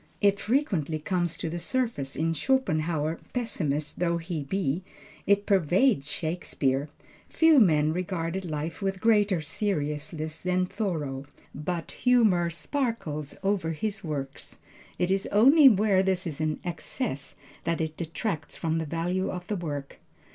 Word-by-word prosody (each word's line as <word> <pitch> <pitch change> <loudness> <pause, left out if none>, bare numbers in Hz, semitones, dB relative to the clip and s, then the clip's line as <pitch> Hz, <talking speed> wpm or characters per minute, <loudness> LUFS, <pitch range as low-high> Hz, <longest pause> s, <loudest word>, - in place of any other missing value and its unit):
It 200 -1 +3
frequently 200 - 0
comes 175 0 -1
to - - -3
the 170 +2 -3
surface 225 - -1
in 165 +1 0
Schopenhauer 160 - 0
pessimist 155 - -1
though 170 -1 +1
he 165 -2 -4
be; 155 +1 -1 0.5
it 200 0 +3
pervades 185 - +3
Shakespeare. 150 -4 -1 0.4
Few 320 -3 +5
men 155 -7 +4
regarded 180 0 -2
life 155 0 -4
with 195 -1 -1
greater 205 -5 +3
seriousness 155 -2 -2
than 180 0 +1
Thoreau, 150 -10 -3 0.3
but 165 +3 -4
humor 215 -9 +3
sparkles 170 - -3
all 195 - +3
over 165 -5 -1
his 205 +4 -3
works. 140 -4 -5 0.4
It 180 +1 +1
is 195 0 +1
only 270 +7 +7
where 205 -3 +3
this 190 -1 0
is 155 -3 -4
in 155 -1 -1
excess 175 - -4 0.3
that 165 0 0
it 160 -1 -2
detracts 165 +1 -4
from 165 -1 0
the 160 - -3
value 175 +4 -1
of 180 -1 -5
the 210 - -2
work. 145 -6 -5
170 Hz, 140 wpm, -27 LUFS, 155-200 Hz, 0.5 s, only